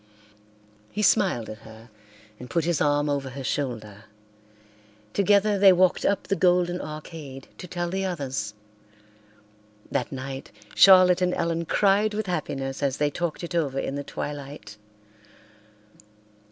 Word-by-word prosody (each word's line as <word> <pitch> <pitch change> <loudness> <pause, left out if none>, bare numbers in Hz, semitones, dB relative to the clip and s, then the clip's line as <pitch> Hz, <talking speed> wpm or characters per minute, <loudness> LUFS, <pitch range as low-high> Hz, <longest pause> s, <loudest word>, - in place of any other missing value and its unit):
He 210 - -2
smiled 185 - +2
at 110 +1 -8
her 110 +1 -14 0.5
and 125 - -9
put 170 -2 0
his 170 -3 0
arm 145 0 +2
over 140 -2 -1
her 135 +1 -7
shoulder. 110 -7 -4 1.1
Together 200 +1 +3
they 195 -1 +8
walked 185 0 +3
up 200 - +1
the 195 - -1
golden 180 -1 +2
arcade 150 -3 -8
to 180 - -8
tell 175 0 -3
the 190 +1 -1
others. 135 - -3 1.4
That 125 - -1
night 135 0 -6 0.2
Charlotte 185 -1 +7
and 180 0 +1
Ellen 170 0 -1
cried 205 +4 +2
with 215 0 -2
happiness 140 -6 -3
as 140 -1 0
they 145 0 +1
talked 175 +2 -3
it 170 - -5
over 145 -6 0
in 135 - -2
the 145 0 -4
twilight. 140 -8 -7
155 Hz, 140 wpm, -25 LUFS, 135-180 Hz, 1.4 s, they